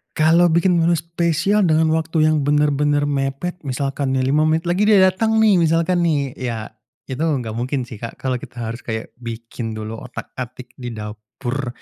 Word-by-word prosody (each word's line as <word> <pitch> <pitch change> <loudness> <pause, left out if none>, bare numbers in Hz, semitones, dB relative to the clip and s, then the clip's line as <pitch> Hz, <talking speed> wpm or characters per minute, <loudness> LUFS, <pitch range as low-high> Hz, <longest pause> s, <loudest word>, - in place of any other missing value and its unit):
Kalau 165 +3 +5
bikin 170 +1 +3
menu 170 +1 +3
spesial 170 +4 +1
dengan 160 0 +3
waktu 160 0 +1
yang 155 - +2
benar-benar 145 0 +2
mepet 140 +5 -2
misalkan 135 +1 -1
nih 130 - +1
5 155 +2 +3
menit 160 +1 +1
lagi 180 +4 +1
dia 215 - +6 0.2
datang 220 +3 +2
nih 205 -4 +5
misalkan 165 +2 +2
nih, 140 -4 0
ya 115 -4 -4 0.3
itu 130 0 -6
gak 140 -8 0
mungkin 125 +4 -2
sih, 115 -3 -10
Kak. 115 0 -6
Kalau 130 -2 -2
kita 120 0 -8
harus 115 +1 -4
kayak 110 -2 -5
bikin 115 -1 -6
dulu 110 +1 -6
otak-atik 125 0 -8
di 120 -2 -5
dapur, 110 +5 -5
145 Hz, 175 wpm, -20 LUFS, 125-165 Hz, 0.3 s, dia